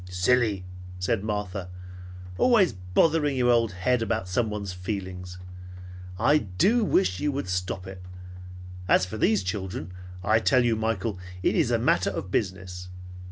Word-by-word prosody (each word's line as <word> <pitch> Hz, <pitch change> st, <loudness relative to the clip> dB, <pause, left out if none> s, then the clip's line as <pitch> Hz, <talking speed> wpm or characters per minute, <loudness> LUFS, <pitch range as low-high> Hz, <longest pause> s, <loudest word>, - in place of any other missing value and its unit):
"Silly," 100 Hz, +1 st, +1 dB, 0.3 s
said 95 Hz, +3 st, -1 dB
Martha. 105 Hz, -3 st, -3 dB, 0.7 s
"Always 210 Hz, -, +4 dB
bothering 140 Hz, -, +1 dB
your 125 Hz, -1 st, +3 dB
old 115 Hz, -3 st, +3 dB
head 115 Hz, +7 st, +1 dB
about 100 Hz, -3 st, -1 dB
someone's 105 Hz, -1 st, -2 dB
feelings! 90 Hz, -1 st, -5 dB, 0.8 s
I 150 Hz, +10 st, +4 dB
do 190 Hz, -, +2 dB
wish 95 Hz, -, +2 dB
you 150 Hz, -, 0 dB
would 140 Hz, -4 st, -3 dB
stop 90 Hz, 0 st, -3 dB
it! 95 Hz, -1 st, -9 dB, 0.9 s
As 95 Hz, -, +4 dB
for 90 Hz, +4 st, -7 dB
these 105 Hz, -2 st, +2 dB
children, 95 Hz, -3 st, -4 dB, 0.3 s
I 110 Hz, +3 st, +3 dB
tell 125 Hz, +2 st, +3 dB
you, 115 Hz, -2 st, +2 dB
Michael, 110 Hz, -2 st, -2 dB, 0.2 s
it -, -, +3 dB
is -, -, +2 dB
a -, -, +2 dB
matter -, -, +2 dB
of 95 Hz, -, -5 dB
business. 95 Hz, -3 st, -3 dB
100 Hz, 145 wpm, -26 LUFS, 90-120 Hz, 0.9 s, Always